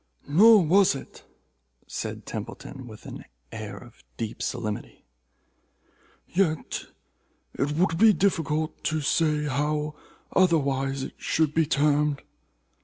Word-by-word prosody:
"Nor 200 +6 +7
was 190 +1 +4
it," 135 - -10 0.6
said - - -5
Templeton, 135 -2 -7
with 110 -2 -12
an - - -8 0.3
air 110 -2 -6
of 120 -2 -15
deep 115 -1 -5
solemnity, 110 -4 -4 1.2
"yet 170 -4 -1 0.7
it 145 +2 -1
would 165 +1 +1
be 220 +1 +8
difficult 160 -6 0
to 155 0 0
say 150 +1 +1
how 150 +2 -1 0.4
otherwise 140 -6 +2
it - - -6
should 155 -2 +1
be 160 -1 +2
termed. 145 0 +2
150 Hz, 110 wpm, -26 LUFS, 135-165 Hz, 1.2 s, be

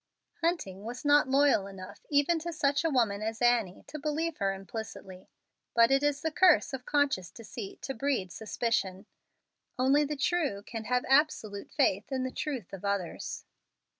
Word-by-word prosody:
Hunting 315 - -2
was 245 +5 -7
not 290 -1 +5
loyal 270 -7 +4
enough 190 -2 -11
even 290 +3 +3
to 340 +2 -4
such 285 -2 +1
a 325 - +2
woman 230 -7 +1
as 220 +1 -3
Annie 240 -6 +2
to 305 - -7
believe 310 +2 -2
her 195 -1 +1
implicitly. 195 -2 -8 0.5
But 230 +2 +6
it 270 0 +4
is 290 -1 +1
the 320 - -1
curse 350 -4 +4
of 255 -2 -6
conscious 285 -11 +1
deceit 225 -2 -9
to 270 - -3
breed 255 -8 -1
suspicion. 215 -3 -2 0.7
Only 270 +4 +4
the 295 0 -3
true 280 - 0
can 225 0 -6
have 250 +2 0
absolute 265 -8 +2
faith 200 +7 +1
in 260 -1 -1
the 260 - -3
truth 255 - -4
of 195 - -8
others. 200 -3 -3
250 Hz, 165 wpm, -30 LUFS, 200-290 Hz, 0.7 s, But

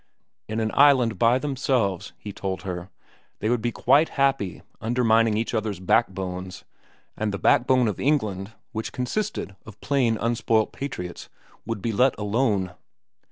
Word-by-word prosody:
In 110 +1 -3
an 110 -1 0
island 130 -6 +4
by 120 +1 +4
themselves, 130 - -1
he 105 - -8
told 95 0 -4
her, 90 -1 -5 0.5
they 110 - -1
would 120 -2 +1
be 120 +1 -1
quite 140 +8 +3
happy 135 -9 +1 0.2
undermining 115 -2 +3
each 115 +2 -2
other's 110 -4 -2
backbones, 95 -2 -1 0.5
and 110 -1 -1
the 100 - -3
backbone 130 0 +3
of 105 - -2
England, 110 -9 0 0.2
which 110 -2 -4
consisted 125 - -3
of 105 -2 -13
plain 125 -6 +1
unspoilt 115 -1 +1
patriots, 90 -11 -6 0.4
would 115 -4 -4
be 115 - 0
let 125 +5 +3
alone. 105 -3 0
115 Hz, 145 wpm, -25 LUFS, 100-125 Hz, 0.5 s, island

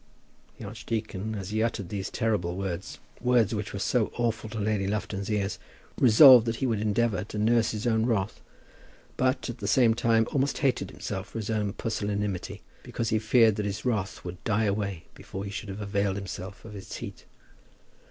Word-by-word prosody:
The - - -8
archdeacon, 110 -1 -4
as 100 -1 -5
he 110 +1 0
uttered 110 -5 -1
these 100 -1 -3
terrible 100 -6 -1
words, 95 0 -4 0.2
words 120 -3 +3
which 105 -1 -3
were 100 - -5 0.4
awful 115 -2 -1
to 110 0 -5
Lady 105 -2 0
Lufton's 100 -1 -3
ears, 100 -2 -1 0.4
resolved 125 0 +9
that 115 - 0
he 135 - -2
would 115 -4 0
endeavour 105 -2 +1
to 105 - -7
nurse 115 +2 +3
his 105 +1 -4
own 110 -1 +2
wrath; 110 -4 -1 0.7
but, 130 +1 +1
at 120 -1 -6
the 100 - -4
same 120 0 +5
time, 115 0 +3
almost 140 0 +1
hated 125 -9 0
himself 100 0 -5
for - - -8
his 110 0 -3
own 105 -2 -1
pusillanimity, 105 -4 -3 0.2
because 115 -2 -3
he 110 -1 +2
feared 110 0 +4
that 105 - -1
his 100 +4 -4
wrath 105 -8 -2
would 90 0 -7
die 105 0 +1
away 100 -4 -2
before 95 +1 -7
he 100 - -5
should 105 0 -6
have 100 +2 -6
availed 100 -1 0
himself 95 0 -7
of 110 -2 -9
its 100 - -8
heat. - - -8
105 Hz, 185 wpm, -27 LUFS, 100-115 Hz, 0.7 s, resolved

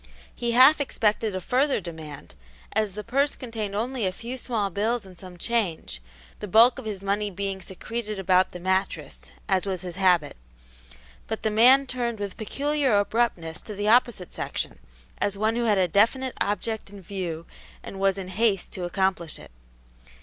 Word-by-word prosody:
He 235 -1 -2
half 265 +5 +7
expected 215 -5 0
a - - -1
further 265 - +2
demand, 160 - -9 0.4
as 215 -2 0
the 210 +2 -6
purse 275 +5 +1
contained 220 -5 -5
only 235 0 -1
a - - 0
few 235 +6 -6
small 225 -6 -2
bills 220 +4 0
and 185 -1 -13
some 180 0 -11
change, 180 - -2 0.4
the 210 - -5
bulk 230 +5 +6
of - - -9
his 200 -3 -5
money 205 +1 0
being 195 0 -4
secreted 215 +3 -5
about 185 -1 +3
the 180 - -8
mattress, 190 - -1 0.3
as 190 +1 +1
was 185 -3 -2
his 180 -1 -6
habit; 180 -6 +3 0.9
but 220 - -4
the 220 - +1
man 255 +6 +6
turned 240 -3 -3
with 200 -2 -5
peculiar 280 +1 +1
abruptness 200 -6 0
to 210 - -8
the 205 +1 0
opposite 230 -6 +3
section, - - -4 0.4
as 200 -1 0
one 220 +2 +1
who 240 0 0
had 210 -3 +3
a 185 -1 +3
definite 230 +8 +2
object 210 +1 -2
in 200 0 -11
view 170 -3 -4 0.4
and 195 - -8
was 195 0 +2
in 185 -1 -5
haste 205 -1 +1
to 180 -2 -3
accomplish 180 -2 0
it. - - -13
205 Hz, 175 wpm, -26 LUFS, 185-235 Hz, 0.9 s, half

